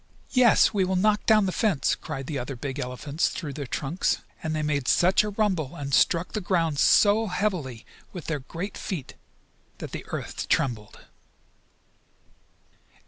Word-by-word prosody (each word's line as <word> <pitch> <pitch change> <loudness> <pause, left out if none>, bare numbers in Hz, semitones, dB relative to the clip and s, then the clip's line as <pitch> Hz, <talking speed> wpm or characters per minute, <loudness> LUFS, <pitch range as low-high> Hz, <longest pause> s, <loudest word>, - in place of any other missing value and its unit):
"Yes, 250 -4 +5
we 200 -2 +2
will 185 0 0
knock 210 +3 +2
down 215 -2 +5
the 185 - 0
fence!" 190 -7 +1
cried 135 - -6
the 145 0 -3
other 125 +2 -5
big 135 +3 -5
elephants 140 +5 -2
through 150 -6 -5
their 140 -1 -6
trunks. 150 +7 -1 0.2
And 160 -1 -2
they 155 - -1
made 145 -3 -1
such 185 +4 +4
a 210 - -2
rumble, 190 -8 -1
and 140 -3 -5
struck 170 +8 +3
the 215 - -3
ground 165 -5 0
so 215 +6 +5
heavily 180 - -2 0.3
with 175 -5 -8
their 160 -3 -2
great 165 +9 -6
feet, 155 -10 -5 0.6
that - - -7
the - - -6
earth - - -5
trembled. 115 -5 -1
165 Hz, 160 wpm, -26 LUFS, 140-195 Hz, 0.6 s, Yes